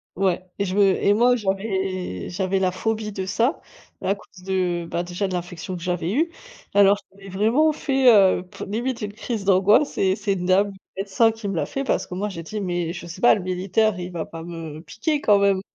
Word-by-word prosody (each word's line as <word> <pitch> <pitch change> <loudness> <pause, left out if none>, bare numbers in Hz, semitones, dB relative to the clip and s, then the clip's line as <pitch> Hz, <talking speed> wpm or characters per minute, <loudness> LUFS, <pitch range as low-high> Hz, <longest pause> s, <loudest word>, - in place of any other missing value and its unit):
Ouais 185 -1 0
et 200 - +1
je 185 0 -3
me 205 - +5 0.2
et 205 - +4
moi 245 +3 +4
j'avais 190 - -2
j'avais 190 +1 -1
la 185 -1 +1
phobie 215 +3 -2
de 190 -1 -4
ça, 230 - 0 0.4
à 195 - +2
cause 190 -2 -15
de 180 -2 -1
bah, 170 +1 -2
déjà 175 +3 -3
de 190 - -5
l'infection 180 +1 -5
que 175 - -8
j'avais 175 0 -2
eue. 325 +7 +1 0.4
Alors 200 0 +6
j'avais 195 0 -13
vraiment 225 +11 +3
fait, 265 -4 +4
heu, 190 -3 +5
p 180 - -9
limite 235 +5 -2
une 210 -1 -3
crise 225 -1 -4
d'angoisse 200 +8 +4
et 190 -1 +2
c'est 205 -1 -1
une 180 -2 -3
dame 195 +2 +3 0.3
médecin 200 +4 +2
qui 225 -2 -7
me 195 - -2
l'a 160 - 0
fait. 275 - -3
Parce 270 - 0
que - - -9
moi 200 +3 -2
j'ai 170 -4 -7
dit: 210 +6 -5
«Mais 175 -3 -2
je 175 - -8
sais 180 +3 -9
pas, 240 - +7
le 205 - -1
militaire 185 +3 0
il 180 0 -5
va 170 -2 -3
pas 165 0 -8
me 165 -2 -7
piquer 290 - -2
quand 210 -7 +4
même?» 200 -1 +3
195 Hz, 225 wpm, -23 LUFS, 180-215 Hz, 0.4 s, pas